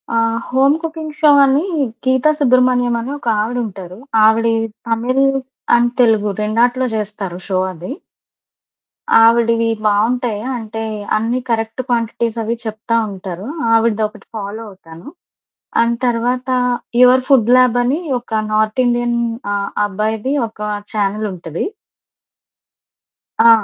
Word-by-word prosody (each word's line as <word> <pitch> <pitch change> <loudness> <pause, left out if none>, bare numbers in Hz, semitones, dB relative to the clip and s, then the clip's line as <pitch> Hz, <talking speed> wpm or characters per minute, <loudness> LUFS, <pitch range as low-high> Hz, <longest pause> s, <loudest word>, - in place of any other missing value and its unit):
ఆ! - - +2 0.3
'Home 270 +3 +3
cooking 315 -2 -5
show' 300 -2 +6
అనీ 275 +4 +2 0.4
గీత 260 +2 +2
సుబ్రహ్మణ్యమని 250 -2 +2
ఒకావిడుంటారు. 215 -6 -3 0.3
ఆవిడీ 225 +1 +3 0.3
Tamil 245 +4 +1 0.5
and 240 0 +2
Telugu 215 -3 +3
రెండాటిలో 240 +4 +1
జేస్తారు 205 -4 -4
షో 190 -2 0
అది. 180 +7 -8 1.3
ఆవిడివి 230 0 +3 0.2
బావుంటాయి. 220 +1 +1 0.2
అంటే, 225 0 -6 0.3
అన్నీ 230 +3 -1
కరెక్ట్ 225 +2 -1
క్వాంటిటీసవి 230 -1 -1
చెప్తా 220 +1 -3 0.2
ఉంటారు. 190 +1 -7 0.3
ఆవిడదొకటి 220 -2 0
ఫాలో 205 +1 -5
అవుతాను. 170 -1 -14 0.7
అండ్ 235 0 +2
తర్వాతా 250 +2 0 0.4
'యువర్ 250 +1 +6
ఫుడ్ 245 -5 +4
ల్యాబనీ' 250 +5 +2 0.2
ఒక 225 -2 -3
నార్తిండియన్ 240 +2 +1 0.7
అబ్బాయిది 215 +5 -2 0.2
ఒకా 210 -1 -7 0.2
ఛానెలుంటది. 195 -5 -3 1.8
ఆ! - - +9
230 Hz, 95 wpm, -17 LUFS, 215-245 Hz, 1.8 s, ఆ